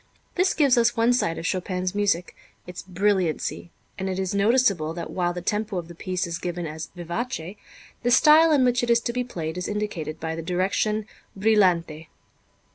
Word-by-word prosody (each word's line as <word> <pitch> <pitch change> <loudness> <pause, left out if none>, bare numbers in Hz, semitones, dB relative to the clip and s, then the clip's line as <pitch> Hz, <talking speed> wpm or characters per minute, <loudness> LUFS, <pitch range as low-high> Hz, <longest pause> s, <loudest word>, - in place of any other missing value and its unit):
This 370 +1 +1
gives 275 -5 +4
us 235 0 +2
one 230 +2 +4
side 165 -9 0
of 165 - -6
Chopin's 185 +1 -2
music, 200 -4 0 0.3
its 180 0 -8
brilliancy; 185 -3 -1 0.3
and 190 0 -2
it 185 - -3
is 190 0 -2
noticeable 200 -7 +2
that 170 - -6
while 175 -1 0
the 175 0 -6
tempo 210 0 -1
of 170 -2 -4
the 170 - -10
piece 185 +2 -3
is 170 0 -4
given 175 -1 -4
as 160 +1 -6
vivace, 175 +1 -4 0.5
the 245 - 0
style 305 +6 +6
in 275 -4 +4
which 245 -1 +2
it 240 - -2
is 235 0 +5
to 235 - -3
be 250 0 -1
played 170 -8 -5
is 180 - -4
indicated 205 -7 -4
by 160 0 -3
the 165 - -5
direction 195 +5 0 0.3
brillante. 180 -7 +2
190 Hz, 190 wpm, -24 LUFS, 170-230 Hz, 0.5 s, style